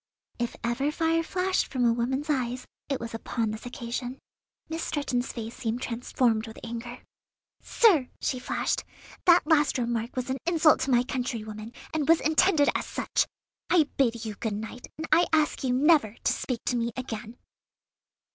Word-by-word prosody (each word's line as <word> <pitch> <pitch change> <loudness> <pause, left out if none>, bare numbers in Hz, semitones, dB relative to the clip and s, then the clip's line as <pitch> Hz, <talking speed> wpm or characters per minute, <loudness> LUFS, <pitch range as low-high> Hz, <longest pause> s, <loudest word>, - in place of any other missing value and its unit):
If 240 0 -2
ever 250 +5 0
fire 330 +1 +1
flashed 370 +3 0
from 255 -2 0
a 230 - +4
woman's 260 +5 -1
eyes, 255 -4 -1 0.2
it 275 - 0
was 230 0 -6
upon 225 -1 -2
this 220 +3 -7
occasion. 245 +1 -5 0.5
Miss 325 +1 -3
Stretton's 255 -4 -1
face 230 -1 -6
seemed 245 -1 -3
transformed 230 -1 0
with 220 - -10
anger. 235 +1 -6 0.6
"Sir!" 335 - +4
she 255 - -1
flashed, 250 - -1 0.4
"that 345 -2 +6
last 300 -3 +3
remark 235 -1 -2
was 255 0 -2
an 265 - -1
insult 330 -2 +5
to - - -1
my 245 -1 +4
countrywomen, 230 -4 -4 0.2
and 310 -1 -1
was 330 - +7
intended 315 -1 +4
as - - -2
such. - - 0 0.4
I 315 -5 +4
bid 235 -4 +1
you 215 - -3
good 210 0 -3
night, 220 +3 -7
and 315 - -4
I 350 - +5
ask 310 -2 +2
you 255 - +1
never 270 -4 +4
to - - +3
speak 245 -4 -3
to 250 - +1
me 235 0 0
again." 230 -2 -6
250 Hz, 170 wpm, -27 LUFS, 235-300 Hz, 0.6 s, was